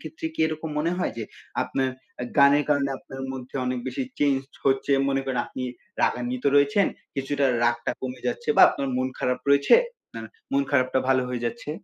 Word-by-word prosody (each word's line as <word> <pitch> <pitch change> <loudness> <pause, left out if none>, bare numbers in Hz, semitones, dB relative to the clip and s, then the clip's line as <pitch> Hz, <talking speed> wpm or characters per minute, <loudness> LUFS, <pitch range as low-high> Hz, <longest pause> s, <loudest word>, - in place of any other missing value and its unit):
ক্ষেত্রে 160 0 -6
কী - - -4
এরকম 155 0 -4
মনে 165 +3 0
হয় - - -1
যে 110 - -3 0.4
আপনার 130 -1 -1 0.5
গানের 140 +1 +6
কারণে 140 -2 +2
আপনার 135 0 -9
মধ্যে 130 0 -9
অনেক 125 0 -1
বেশি 270 - -3 0.2
চেঞ্জ 140 -2 +3 0.3
হচ্ছে 135 +1 +2 0.2
মনে 135 0 +1
করেন 130 -2 -2
আপনি 130 - -6 0.4
রাগান্বিত 125 +1 -1
রয়েছেন 200 +8 +4 0.3
কিছুটা 140 0 0 0.2
রাগটা 120 0 +1
কমে 130 -1 -5
যাচ্ছে 470 - -3
বা - - +8
আপনার 135 - -2
মন 130 0 0
খারাপ 125 0 0
রয়েছে 140 0 +6 0.4
আ - - -5 0.3
মন 140 0 +3
খারাপটা 130 -1 +2
ভালো 130 -1 +4
হয়ে 120 -1 -3
যাচ্ছে? 130 +5 -5
135 Hz, 175 wpm, -25 LUFS, 130-145 Hz, 0.5 s, বা